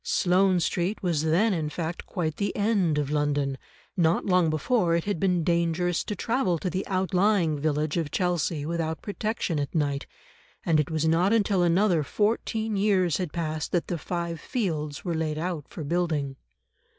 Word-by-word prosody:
Sloane 185 0 +3
Street 180 +5 -1
was 170 -5 +1
then 175 +8 +2
in 155 -4 -1
fact 165 +2 -5
quite 160 -5 -2
the 200 - -2
end 200 -7 +2
of 145 -1 -1
London; 145 -2 0 0.4
not 170 -2 +2
long 180 -4 +3
before 170 - +1
it 170 - 0
had 205 -5 -2
been 180 -2 +1
dangerous 170 +1 +1
to 210 - -3
travel 225 -4 0
to 180 +2 -3
the 185 +3 -3
outlying 185 -3 +1
village 150 +1 0
of 165 -3 -1
Chelsea 170 -3 -1
without 160 0 -2
protection 210 -6 -2
at 145 +2 -4
night, 145 -3 0 0.6
and 160 -2 +3
it 150 - 0
was 160 -1 0
not 170 +5 +3
until 200 -4 +2
another 175 0 +3
fourteen 220 - -1
years 195 -5 +2
had 180 -5 -3
passed 155 -2 -3
that 175 - 0
the 175 - -1
Five 170 0 -3
Fields 155 - -3
were 175 - -1
laid 160 -1 -1
out 165 -3 -3
for 160 - -7
building. 150 -4 -1
170 Hz, 175 wpm, -26 LUFS, 155-190 Hz, 0.6 s, Sloane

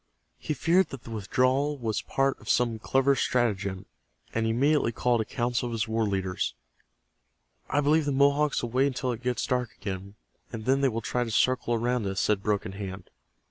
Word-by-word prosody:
He 155 - -3
feared 175 +6 +3
that 135 -3 -9
the 115 - -10
withdrawal 130 +7 +1
was 115 -4 -2
part 135 0 0
of - - -10
some 120 -2 +2
clever 135 +4 +2
stratagem, 100 -7 0 0.5
and 115 0 0
he - - +1
immediately 140 +1 +2
called 120 0 +1
a - - -2
council 120 +2 -1
of 120 - -5
his 110 -1 -1
war 110 0 0
leaders. 95 -6 -2 1.1
"I 145 - +2
believe 150 +2 +3
the 145 - 0
Mohawks 140 +1 +3
will 120 - -3
wait 130 +3 +3
until 130 -1 -2
it 120 -1 -5
gets 125 0 -1
dark 125 -3 -1
again, 100 0 -6 0.4
and 110 -2 -6
then 135 +1 +3
they 135 - +4
will 115 -1 -3
try 125 +2 -1
to 120 - -5
circle 120 +1 +2
around 120 -1 0
us," 95 0 -2
said 105 -2 +1
Broken 100 -2 -1
Hand. 95 -1 -7
120 Hz, 195 wpm, -27 LUFS, 110-135 Hz, 1.1 s, they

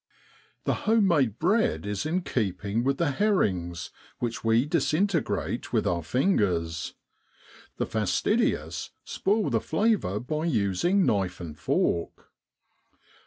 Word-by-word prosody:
The - - +1 0.2
home 220 -3 +5
made 135 - +2
bread 205 - +1
is 105 +6 -2
in 175 +3 0
keeping 105 - -1
with 135 +1 +1
the 165 -4 +1
herrings, 95 - 0 0.3
which 120 -2 -3
we 115 +3 +3
disintegrate 170 +2 0
with - - +1
our 85 -1 0
fingers; 85 - 0 0.8
the - - 0
fastidious 110 - 0 0.2
spoil 210 +2 0
the - - +1
flavour 205 - +1
by 155 +7 -3
using 165 - +2
knife 95 -3 0
and 80 -4 -7
fork. 85 +2 -1
120 Hz, 120 wpm, -27 LUFS, -, 0.8 s, home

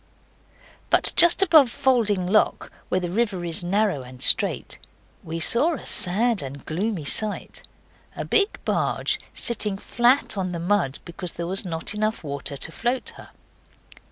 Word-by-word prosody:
But - - +4
just 345 +2 +8
above 315 -8 +5
Falding 220 -7 +1
Lock, 205 +4 0 0.2
where 185 - +1
the 175 -1 -5
river 200 -4 -1
is 170 +1 -1
narrow 195 -4 0
and 125 0 -13
straight, - - +2 0.4
we 165 +1 -6
saw 285 - +1
a - - -10
sad 220 +5 +1
and 140 0 -9
gloomy 180 0 -3
sight 210 +8 -3 0.5
a - - -5
big 410 -1 +1
barge - - -1 0.2
sitting 210 -4 -2
flat 240 +1 +1
on 185 -1 -3
the 170 - -4
mud 175 -6 0
because 175 +1 -7
there 170 - -5
was 190 +3 0
not 165 +2 -4
water - - -8
enough 215 -1 -2 0.4
to - - -3
float 245 +8 -2
her. - - -14
200 Hz, 155 wpm, -23 LUFS, 170-235 Hz, 0.5 s, just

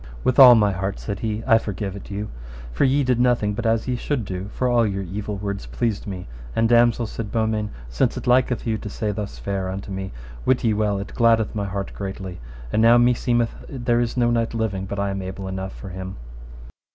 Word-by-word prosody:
With 130 - +2
all 125 -2 +11
my 105 -2 +4
heart, 95 +1 -3
said 100 -3 -4
he, 110 0 -2
I 115 -3 +5
forgive 100 -2 -4
it 100 - -9
you, 105 +1 -4 0.4
for - - +2
ye 140 +2 +3
did 125 -2 +1
nothing 120 -4 +2
but 115 +2 -2
as 115 +1 +1
ye 125 - 0
should 125 -1 -2
do, 95 +1 -5
for 125 - -1
all 120 -1 +4
your 100 -3 -1
evil 100 +3 -4
words 100 0 -4
pleased 115 -4 -2
me; 95 -6 -6 0.3
and 115 - +3
damosel, 120 0 +4
said 110 -1 -5
Beaumains, 110 -2 0 0.2
since - - 0
it - - -5
liketh 125 0 +2
you 110 -2 0
to 105 - -6
say 105 +1 -2
thus 105 -1 -5
fair 95 -2 -3
unto 95 +1 -5
me, 95 0 -4 0.3
wit 130 - +2
ye 115 -2 +3
well 105 -1 +1
it 100 - -6
gladdeth 115 -2 +3
my 105 -2 -2
heart 100 0 -4
greatly, 95 -2 -6 0.3
and 110 - +3
now 115 +1 +7
meseemeth 120 -1 +2 0.2
there 120 -3 0
is 120 +1 -2
no 120 -1 +3
knight 115 -1 0
living 105 -4 -1
but 100 - -5
I 100 0 0
am 95 0 -3
able 95 +1 -6
enough 95 0 -4
for 100 - -9
him. 95 +1 -6
105 Hz, 225 wpm, -23 LUFS, 100-120 Hz, 0.4 s, all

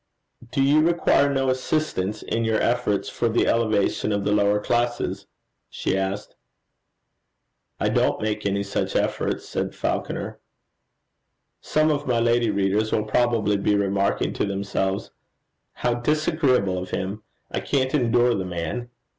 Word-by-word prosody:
'Do 135 - +1
you 145 +3 +5
require 160 -4 +3
no 135 -1 0
assistance 130 -7 -1
in 115 - -1
your 110 -1 +1
efforts 105 -4 0
for 115 - -1
the 115 - +2
elevation 110 -2 +1
of 100 -1 0
the 105 - +1
lower 105 0 +3
classes?' 120 -4 -1 0.4
she - - -2
asked. 95 +1 -3 1.4
'I - - +1
don't - - +1
make 105 0 -2
any 100 0 0
such 100 0 -2
efforts,' - - -1
said - - -3
Falconer. - - -3 1.2
Some 155 0 +2
of 145 -1 -2
my 120 -2 +2
lady 120 0 +2
readers 100 +2 +1
will 110 - +1
probably 110 -2 +2
be 105 +1 +1
remarking 100 -1 0
to - - -1
themselves, 100 -1 -2 0.6
'How 120 - 0
disagreeable 130 - +1
of 90 - -6
him! 100 +3 -3 0.3
I - - -1
can't 130 -2 0
endure 120 -3 +3
the 95 - -1
man.' 90 +7 -4
110 Hz, 140 wpm, -24 LUFS, 100-125 Hz, 1.4 s, you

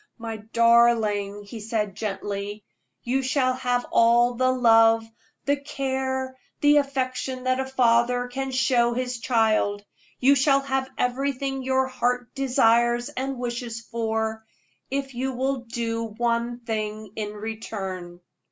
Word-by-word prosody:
"My 225 -2 -5
darling," 220 -2 +2
he 210 +3 -9
said, 210 -2 -2
gently, 205 0 -4 0.4
"you 260 +3 0
shall 260 0 +1
have 250 -1 -1
all 240 +1 +4
the 255 +2 +1
love, 225 -2 +5 0.4
the 285 0 +2
care, 265 -2 -3 0.2
the 295 0 +5
affection 260 -2 -1
that 255 0 +1
a 265 - -2
father 245 -1 +2
can 270 +2 -4
show 250 -2 +2
his 250 -1 -2
child 215 -4 +1 0.3
you 270 +2 +5
shall 275 0 +3
have 265 -1 -2
everything 270 +1 -1
your 260 0 +1
heart 245 -1 -1
desires 240 -3 +2
and 265 +1 -4
wishes 240 -1 -4
for, 220 -1 -2 0.5
if 270 0 -3
you 260 +2 -2
will 260 0 -2
do 230 -1 -3
one 235 +2 -1
thing 215 -2 -4
in 210 -1 -4
return." 195 -5 -6
240 Hz, 130 wpm, -25 LUFS, 225-260 Hz, 0.5 s, love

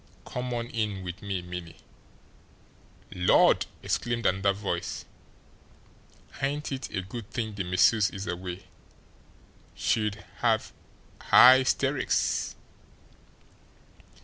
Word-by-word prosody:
Come 125 0 -4
on 115 -1 -2
in 105 -4 -2
with 90 -1 -7
me, 95 -3 -3
Minnie." 90 -2 -7 1.4
"Lord!" 90 -1 +4 0.2
exclaimed 120 -1 -1
another 95 +1 +2
voice. 95 -3 -4 1.4
"Ain't 145 +2 -2
it 135 -1 -4
a 95 - -3
good 100 +2 -8
thing 110 -2 -3
the 100 -1 -3
missus 95 +4 +3
is 95 0 -7
away. 90 -1 -5 1.1
She'd 105 -2 -1
have - - +1 0.6
highsteericks!" 130 +1 +4
100 Hz, 95 wpm, -27 LUFS, 90-115 Hz, 1.4 s, Lord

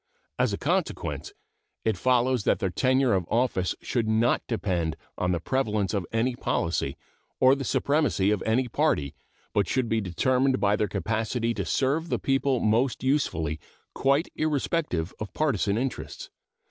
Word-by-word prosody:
As - - +2
a - - -2
consequence - - -2 0.5
it 110 -2 +2
follows 125 +2 +2
that - - +2
their 95 -4 -1
tenure 130 +3 +2
of 90 -3 0
office 115 -7 +1
should 115 -3 -1
not 110 +2 +2
depend 85 -8 -1 0.2
on 90 - 0
the 85 - 0
prevalence 105 -2 0
of 95 -5 -1
any 120 +2 0
policy 85 - -1 0.4
or 130 +1 +6
the 135 0 -2
supremacy 135 -5 +1
of 105 - 0
any 125 +3 +1
party, 70 - 0 0.4
but 100 -3 +2
should 130 -2 0
be 115 0 +1
determined 130 +8 +1
by 100 +1 +3
their 105 - 0
capacity 115 +4 -1
to - - -3
serve 150 +5 0
the - - +1
people 135 -1 +1
most 115 +5 +1
usefully 85 - 0 0.3
quite 140 +4 +2
irrespective 150 - -1
of 105 - -6
partisan 110 -9 +1
interests. 130 +2 -4
115 Hz, 155 wpm, -26 LUFS, 100-130 Hz, 0.5 s, or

